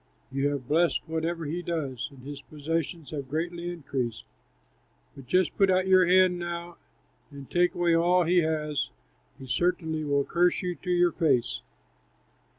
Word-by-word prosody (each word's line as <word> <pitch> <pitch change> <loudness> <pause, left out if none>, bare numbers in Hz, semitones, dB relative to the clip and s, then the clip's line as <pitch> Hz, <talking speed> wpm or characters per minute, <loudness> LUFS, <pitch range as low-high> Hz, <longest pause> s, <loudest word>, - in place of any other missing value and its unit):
You 135 +1 0
have 140 -4 -3
blessed 165 -1 +2
whatever 165 +1 -2
he 165 +4 -3
does, 145 -8 -3
and 135 -3 -15
his 145 +1 -7
possessions 155 +2 -4
have 140 -4 -5
greatly 170 +3 -3
increased. 135 -8 -4 0.9
But 135 -3 -12
just 185 +5 +2
put 195 -1 +4
out 185 0 +3
your 185 -1 +5
hand 185 0 +4
now 175 0 -5 0.5
and 140 -2 -10
take 175 0 +2
away 175 -1 +2
all 175 +2 +4
he 175 +2 +3
has; 150 -3 -1 0.5
he 135 - -10
certainly 160 +3 0
will 140 -1 +1
curse 175 +2 +2
you 180 -1 -1
to 180 - -9
your 175 -1 +4
face." 140 -8 +1
165 Hz, 155 wpm, -27 LUFS, 140-175 Hz, 0.9 s, your